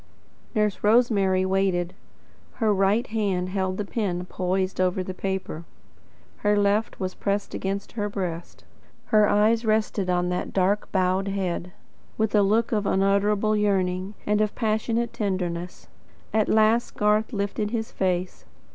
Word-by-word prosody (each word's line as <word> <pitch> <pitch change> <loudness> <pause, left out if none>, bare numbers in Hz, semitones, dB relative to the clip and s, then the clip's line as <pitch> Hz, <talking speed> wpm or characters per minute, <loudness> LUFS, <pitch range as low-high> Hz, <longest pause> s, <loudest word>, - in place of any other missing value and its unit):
Nurse 210 -2 0
Rosemary 205 -4 +3
waited. 185 -2 0 0.6
Her 220 -3 +1
right 200 +5 +2
hand 200 -5 -1
held 190 -1 -1
the 210 - -2
pen 185 -5 -2
poised 185 +1 -1
over 185 0 +1
the 185 - -5
paper. 190 -3 -4 0.7
Her 205 0 +2
left 205 +2 +1
was 185 -1 -3
pressed 200 0 -2
against 195 +1 -3
her 210 -2 -2
breast. 175 -4 -5 0.5
Her 210 -1 +6
eyes 220 +3 +3
rested 215 -3 0
on 180 0 +1
that 180 - -3
dark 195 +2 +1
bowed 190 +1 +1
head, 180 -3 -2 0.5
with 220 -1 0
a 210 - +5
look 215 +4 +2
of 210 -3 0
unutterable 200 +2 +2
yearning 190 -1 0
and 210 0 +2
of 215 -1 0
passionate 230 +1 0
tenderness. 180 -4 -3 0.5
At 215 -1 +2
last 220 +2 +3
Garth 210 +2 +2
lifted 205 0 -2
his 225 -1 -3
face. 185 -1 -2
200 Hz, 140 wpm, -25 LUFS, 185-215 Hz, 0.7 s, Her